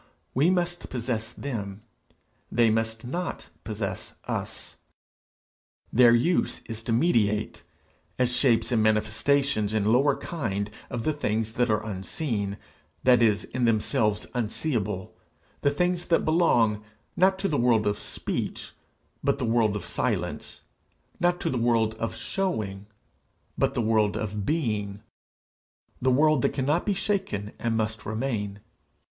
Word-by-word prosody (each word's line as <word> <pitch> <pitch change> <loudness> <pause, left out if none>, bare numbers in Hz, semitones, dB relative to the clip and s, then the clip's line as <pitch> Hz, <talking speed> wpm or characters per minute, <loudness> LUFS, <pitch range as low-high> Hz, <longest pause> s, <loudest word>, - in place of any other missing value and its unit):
We 145 +7 +4
must 175 -1 -1
possess 115 -3 -2
them; 105 -7 -5 0.7
they 115 -1 +4
must 115 +1 -1
not 175 +8 -4
possess 100 -4 -4
us. - - -4 1.2
Their 120 0 +7
use 170 +10 +1
is 115 -1 -5
to - - -1
mediate 115 -6 +2 0.6
as 125 -1 +2
shapes 115 -3 +2
and 115 -3 +3
manifestations 110 +1 +2
in 110 +1 +2
lower 140 +3 +4
kind 105 - -3 0.2
of 120 -3 -3
the 155 - +1
things 110 -6 -1
that 120 0 +1
are 105 0 +1
unseen, 100 +1 -3 0.5
that 125 -2 +5
is, 105 -3 +3
in 125 -1 -1
themselves 110 -1 +1
unseeable, 110 - -2 0.5
the 140 - +4
things 175 +4 0
that 165 - +2
belong, 120 -11 +3 0.3
not 190 +1 +4
to 195 - 0
the 155 - 0
world 120 -3 +3
of 105 0 0
speech, - - -4 0.5
but 140 0 +2
the 130 - -2
world 115 -2 +2
of 105 - -4
silence, - - -2 0.6
not 175 0 +2
to - - 0
the 125 - -1
world 115 -2 +2
of 115 - -2
showing, 110 - -2 0.7
but - - +1
the 120 - +1
world 110 -2 +2
of 105 -2 -3
being, 105 -10 -1 1.0
the 130 - +3
world 150 +1 +4
that - - +1
cannot 145 +7 0
be 205 - +3
shaken, 190 - -1
and 115 -1 0
must 110 0 -2
remain. 110 -3 -3
115 Hz, 140 wpm, -27 LUFS, 105-140 Hz, 1.2 s, Their